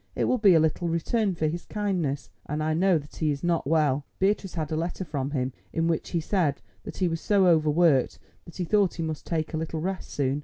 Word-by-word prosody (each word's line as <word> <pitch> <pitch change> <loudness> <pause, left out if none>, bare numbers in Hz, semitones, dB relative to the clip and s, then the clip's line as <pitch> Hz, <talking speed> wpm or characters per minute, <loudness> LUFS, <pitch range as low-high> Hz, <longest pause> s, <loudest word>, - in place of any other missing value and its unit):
It - - 0
will 255 - +1
be 200 -5 +6
a - - +6
little 160 +2 +1
return 185 +5 0
for 160 - -1
his 170 +3 -2
kindness, 180 -10 -2 0.2
and 150 +1 -2
I 155 0 +1
know 180 +2 +3
that 145 -1 -10
he 155 - 0
is 145 +1 -2
not 170 -5 0
well. 150 -3 +2
Beatrice 195 -1 0
had 160 -1 -3
a - - 0
letter 170 +3 -3
from 140 -4 -3
him 130 -3 -2 0.2
in 165 0 0
which 165 -1 -1
he 170 - 0
said 160 -4 0 0.3
that - - -7
he 185 - +1
was 165 -1 -2
so 200 -2 +3
overworked 155 -4 +3 0.3
that 170 - -12
he 185 - -1
thought 200 0 +2
he 165 - -3
must 155 -2 -5
take 160 -1 -2
a - - 0
little 160 0 -3
rest 185 +3 -4
soon. 140 0 -1
165 Hz, 240 wpm, -26 LUFS, 155-180 Hz, 0.3 s, be